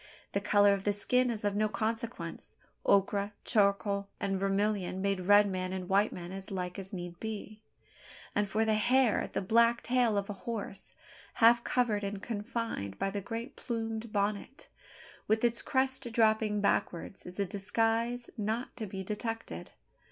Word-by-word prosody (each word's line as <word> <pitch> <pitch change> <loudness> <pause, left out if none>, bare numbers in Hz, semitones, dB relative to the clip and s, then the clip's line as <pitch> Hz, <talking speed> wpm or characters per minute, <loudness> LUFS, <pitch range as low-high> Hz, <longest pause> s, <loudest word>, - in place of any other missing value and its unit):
The 200 - 0
colour 205 0 +5
of 195 -1 -2
the 205 - +2
skin 250 +5 +2
is 215 -3 -3
of 205 -1 +1
no 215 +1 +2
consequence. 225 +3 -4 0.3
Ochre, 200 +1 +3
charcoal, 200 -2 +2
and 195 -1 -1
vermilion 195 -1 0
made 195 -2 -1
red 205 0 +7
man 185 -1 -2
and 185 -1 -4
white 200 +3 +3
man 175 0 -7
as 195 0 -7
like 180 -1 -4
as 190 0 -8
need 175 -2 -6
be; 215 -1 -6 0.7
and 205 -1 +1
for 220 +3 +1
the 220 - +2
hair, 240 +2 +3
the - - -2
black 235 +4 +4
tail 240 -4 +2
of 200 0 -1
a 205 - -4
horse, 200 -1 -5 0.4
half 235 +1 +6
covered 225 -5 +1
and 200 0 -3
confined 220 - -3
by 195 - -1
the 200 0 -3
great 230 +5 -5
plumed 225 -2 -4
bonnet, 205 +6 -2 0.6
with 220 +1 +2
its 235 -1 +2
crest 260 -2 0
dropping 220 -2 +3
backward, 185 -2 0
is 180 +2 -9
a 200 - +2
disguise 225 +5 0
not 220 +4 -2
to 220 -3 -4
be 190 0 -5
detected. 225 +3 -4
210 Hz, 165 wpm, -31 LUFS, 195-230 Hz, 0.7 s, red